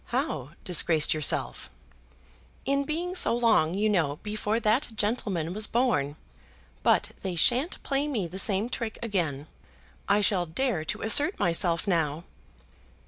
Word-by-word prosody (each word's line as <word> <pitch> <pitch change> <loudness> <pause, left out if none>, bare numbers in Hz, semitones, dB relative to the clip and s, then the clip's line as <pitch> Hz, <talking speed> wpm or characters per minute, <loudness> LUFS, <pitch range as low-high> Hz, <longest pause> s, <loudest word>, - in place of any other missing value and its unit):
"How 240 - -3
disgraced 165 -3 +3
yourself?" 155 -1 -1 1.0
"In 280 +1 +1
being 340 +5 -3
so 300 -10 +4
long, 205 -8 +2
you 210 +2 +1
know, 165 -9 +1
before 210 +1 -2
that 235 +6 +1
gentleman 205 -6 -2
was 215 +2 -1
born. 220 - 0 0.7
But - - +2
they 185 -2 -4
shan't 255 - +1
play 280 +1 0
me 235 -11 -2
the 180 +3 -5
same 200 +2 +1
trick 230 -2 -4
again. 165 -10 -2 0.6
I 205 +1 +4
shall 185 -3 +2
dare 200 0 -1
to 150 - -4
assert 290 - +3
myself, 170 0 +1
now. 165 -4 -1
205 Hz, 140 wpm, -27 LUFS, 165-240 Hz, 1.0 s, so